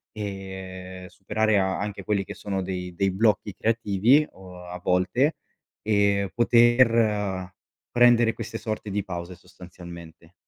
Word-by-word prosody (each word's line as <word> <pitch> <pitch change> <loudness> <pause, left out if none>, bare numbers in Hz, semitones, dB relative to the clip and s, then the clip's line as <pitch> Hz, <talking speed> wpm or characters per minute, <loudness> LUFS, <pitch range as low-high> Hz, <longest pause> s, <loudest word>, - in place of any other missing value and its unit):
e 95 -2 -7
superare 105 +3 0
anche 100 +1 -2
quelli 100 -1 0
che - - -8
sono 100 -2 -3
dei 90 -1 -5
dei 100 +1 +1
blocchi 105 0 +1
creativi 115 +6 +2
o 90 -1 -12
a 90 +1 -7
volte 120 - +1 0.4
e 100 -2 +2
poter 115 -6 +3 0.4
prendere 120 -1 +5
queste - - -6
sorte 110 -2 -4
di 100 0 -1
pause, 90 -1 -6
sostanzialmente. 85 -1 -13
100 Hz, 120 wpm, -25 LUFS, 90-110 Hz, 0.4 s, prendere